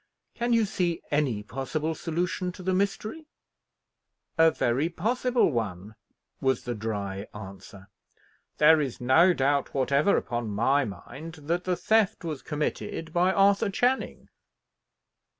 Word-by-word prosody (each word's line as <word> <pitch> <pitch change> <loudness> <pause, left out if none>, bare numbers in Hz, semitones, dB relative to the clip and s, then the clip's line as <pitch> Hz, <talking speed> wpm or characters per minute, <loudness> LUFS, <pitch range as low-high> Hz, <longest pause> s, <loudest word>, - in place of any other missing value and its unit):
Can 240 0 -2
you 230 -2 +4
see 175 -4 -1
any 135 -8 0
possible 140 +7 -3
solution 175 +2 -2
to 185 - -11
the 185 +1 0
mystery?" 200 - -2 1.1
"A 165 0 +6
very 135 +2 0
possible 240 +5 +1
one," 105 -4 -4 0.5
was 130 -2 0
the 120 - -3
dry 100 -2 -4
answer. 95 -1 -11 0.7
"There 155 +1 +6
is 135 -4 -4
no 160 +9 +5
doubt 140 -1 0
whatever 140 +7 +3
upon 120 -2 -3
my 130 +7 +2
mind, 150 - -9
that 170 +4 -1
the 180 -1 +1
theft 220 0 +1
was 155 -5 -4
committed 150 +2 -4
by 180 +2 +3
Arthur 200 +1 +3
Channing." 245 +6 -1
155 Hz, 130 wpm, -27 LUFS, 120-185 Hz, 1.1 s, A